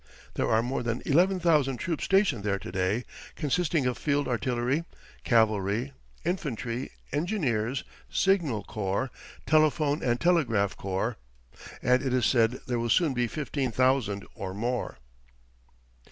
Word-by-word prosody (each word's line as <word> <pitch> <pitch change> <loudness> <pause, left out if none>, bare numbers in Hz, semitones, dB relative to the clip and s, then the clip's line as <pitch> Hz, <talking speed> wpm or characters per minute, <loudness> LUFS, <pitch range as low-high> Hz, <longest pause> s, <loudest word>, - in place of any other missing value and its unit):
There - - -1
are 110 +1 +3
more 125 +1 -2
than 120 0 -2
eleven 180 +6 +3
thousand 150 -7 +2
troops 165 +4 -2
stationed 195 - +2
there 100 -1 0
to 95 - -8
day, 95 +6 0 0.3
consisting 155 -1 0
of 125 -1 -1
field 145 -1 0
artillery, 125 +5 0 0.4
cavalry, 110 +2 +2 0.3
infantry, 130 - -2 0.2
engineers, 140 - 0 0.3
signal 165 - +1
corps, 105 +4 -2 0.3
telephone 155 -1 +3
and 120 -1 +1
telegraph 120 - +2
corps, 100 +4 -2 0.7
and 125 +1 +4
it 130 -2 0
is 125 - +2
said 120 0 +2
there 125 -2 -1
will 120 0 -1
soon 160 +1 +3
be 120 -1 0
fifteen 140 -1 -2
thousand 125 -5 +1
or 95 -1 -6
more. 120 - -2
125 Hz, 135 wpm, -28 LUFS, 115-150 Hz, 0.7 s, and